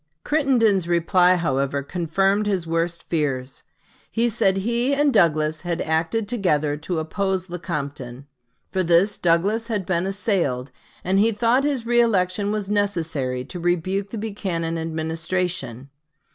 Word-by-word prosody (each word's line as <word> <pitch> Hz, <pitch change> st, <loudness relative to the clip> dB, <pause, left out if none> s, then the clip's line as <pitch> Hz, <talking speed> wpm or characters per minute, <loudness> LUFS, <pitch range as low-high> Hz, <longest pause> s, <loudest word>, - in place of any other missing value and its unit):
Crittenden's 235 Hz, -, +2 dB
reply, 180 Hz, +1 st, +3 dB
however, 140 Hz, -4 st, -1 dB
confirmed 195 Hz, +6 st, 0 dB
his 190 Hz, -5 st, 0 dB
worst 165 Hz, +1 st, -1 dB
fears. 135 Hz, -5 st, -2 dB, 0.5 s
He 235 Hz, +1 st, +1 dB
said 195 Hz, -3 st, +2 dB
he 235 Hz, +7 st, +1 dB
and 290 Hz, -1 st, +2 dB
Douglas 155 Hz, -5 st, +2 dB
had 175 Hz, -1 st, -3 dB
acted 165 Hz, +7 st, 0 dB
together 155 Hz, -11 st, 0 dB
to 160 Hz, +3 st, -4 dB
oppose 190 Hz, +2 st, -2 dB
Lecompton. 140 Hz, -7 st, -5 dB, 0.5 s
For 190 Hz, -, 0 dB
this 175 Hz, +4 st, +3 dB
Douglas 195 Hz, +7 st, +1 dB
had 210 Hz, -5 st, -2 dB
been 180 Hz, 0 st, 0 dB
assailed, 175 Hz, -, -1 dB, 0.3 s
and 190 Hz, +2 st, +2 dB
he 220 Hz, +3 st, +4 dB
thought 235 Hz, +5 st, +2 dB
his 280 Hz, -5 st, 0 dB
reëlection 205 Hz, -5 st, +2 dB
was 210 Hz, -2 st, -2 dB
necessary 165 Hz, -11 st, -1 dB
to 175 Hz, -, -7 dB
rebuke 180 Hz, +3 st, -1 dB
the 225 Hz, -, -6 dB
Buchanan 185 Hz, -6 st, -3 dB
Administration. 160 Hz, -4 st, -2 dB
180 Hz, 130 wpm, -23 LUFS, 160-205 Hz, 0.5 s, he